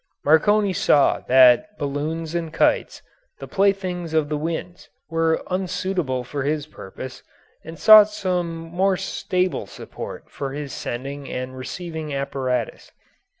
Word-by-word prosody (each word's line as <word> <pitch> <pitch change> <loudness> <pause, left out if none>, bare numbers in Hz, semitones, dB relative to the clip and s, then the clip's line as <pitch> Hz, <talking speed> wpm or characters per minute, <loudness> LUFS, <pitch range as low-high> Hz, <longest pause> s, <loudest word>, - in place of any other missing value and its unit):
Marconi 200 +6 +4
saw 145 -4 +3
that 130 +12 +5
balloons 155 +3 -3
and 170 -2 -3
kites, - - +1 0.3
the - - -9
playthings 185 -4 0
of 155 -2 +2
the 155 - -1
winds, 165 +3 -5 0.2
were 165 0 +1
unsuitable 180 -7 -2
for 140 +3 -5
his 145 +1 -1
purpose, 130 -2 -10 0.4
and 165 +1 -9
sought 215 +1 +8
some 180 -4 -2
more 180 +4 0
stable 185 -1 -2
support - - -9
for 135 -1 -6
his 145 -2 -6
sending 135 +3 -5
and 130 +1 -5
receiving 155 +2 -6
apparatus. 130 -3 -3
160 Hz, 125 wpm, -22 LUFS, 140-180 Hz, 0.4 s, sought